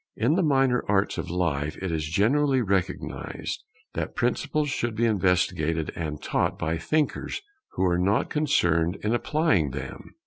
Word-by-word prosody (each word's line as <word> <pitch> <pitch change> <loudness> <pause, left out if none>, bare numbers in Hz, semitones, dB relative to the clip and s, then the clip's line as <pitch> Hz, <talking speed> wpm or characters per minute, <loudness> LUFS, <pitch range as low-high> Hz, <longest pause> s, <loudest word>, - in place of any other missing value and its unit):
In 120 +7 +2
the 185 - +2
minor 135 -5 +3
arts 100 0 +1
of 90 - -4
life 80 -4 -1
it 95 -2 -3
is 80 -1 -2
generally 130 - +3
recognized 100 -5 -2 0.3
that - - -3
principles 150 -1 0
should 120 -3 -1
be 115 +2 +2
investigated 90 -6 +1
and 75 -3 -4
taught - - 0
by 80 +1 -1
thinkers 155 - -1 0.3
who 95 - +1
are 90 -1 +2
not 100 +5 +2
concerned 85 - +2
in 105 +2 +1
applying 135 - +2
them. - - -8
95 Hz, 150 wpm, -26 LUFS, 85-130 Hz, 0.3 s, minor